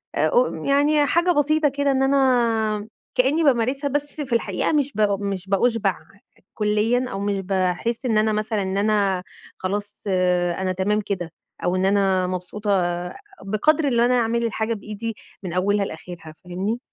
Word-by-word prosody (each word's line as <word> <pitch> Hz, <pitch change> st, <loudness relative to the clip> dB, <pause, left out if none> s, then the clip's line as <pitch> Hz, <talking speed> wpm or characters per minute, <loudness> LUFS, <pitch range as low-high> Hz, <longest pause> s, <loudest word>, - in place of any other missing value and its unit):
آآ -, -, +2 dB
ق -, -, +3 dB, 0.2 s
يعني 290 Hz, +1 st, +3 dB
حاجة 345 Hz, +3 st, +3 dB
بسيطة 305 Hz, 0 st, +2 dB
كده 280 Hz, +1 st, 0 dB
إن 265 Hz, 0 st, +2 dB
أنا 230 Hz, -6 st, +2 dB, 0.3 s
كأني 275 Hz, +6 st, +2 dB
بامارسها 270 Hz, +1 st, +2 dB
بس 290 Hz, +2 st, -3 dB
في 260 Hz, -4 st, -4 dB
الحقيقة 205 Hz, -, 0 dB
مش 290 Hz, -2 st, +1 dB
ب 215 Hz, -, 0 dB, 0.2 s
مش 195 Hz, -1 st, -4 dB
بأُشبع 205 Hz, -2 st, +1 dB, 0.6 s
كليًا 215 Hz, +4 st, +1 dB
أو 195 Hz, -, -4 dB
مش 200 Hz, -1 st, -1 dB
باحس 190 Hz, +6 st, -1 dB
إن 220 Hz, -3 st, +2 dB
أنا 215 Hz, 0 st, +2 dB
مثلًا 215 Hz, 0 st, -1 dB
إن 190 Hz, +1 st, -2 dB
أنا 200 Hz, -3 st, +1 dB, 0.3 s
خلاص 205 Hz, +2 st, -4 dB, 0.6 s
أنا 185 Hz, -1 st, 0 dB
تمام 205 Hz, +3 st, 0 dB
كده، 180 Hz, -5 st, -4 dB, 0.3 s
أو 180 Hz, -, +1 dB
إن 185 Hz, -, +1 dB
أنا 195 Hz, -2 st, +2 dB
مبسوطة 185 Hz, +3 st, -4 dB, 0.8 s
بقدر 285 Hz, +10 st, +2 dB
إن 235 Hz, -2 st, +1 dB
أنا 245 Hz, +1 st, +4 dB
أعمل 235 Hz, 0 st, 0 dB
الحاجة 225 Hz, 0 st, -1 dB
بإيدي 215 Hz, +2 st, -6 dB, 0.3 s
من 175 Hz, -, -5 dB
أولها 200 Hz, +2 st, +1 dB
لآخرها، 160 Hz, -2 st, -9 dB
فاهمني؟ 190 Hz, +6 st, -2 dB
215 Hz, 155 wpm, -23 LUFS, 195-260 Hz, 0.8 s, أنا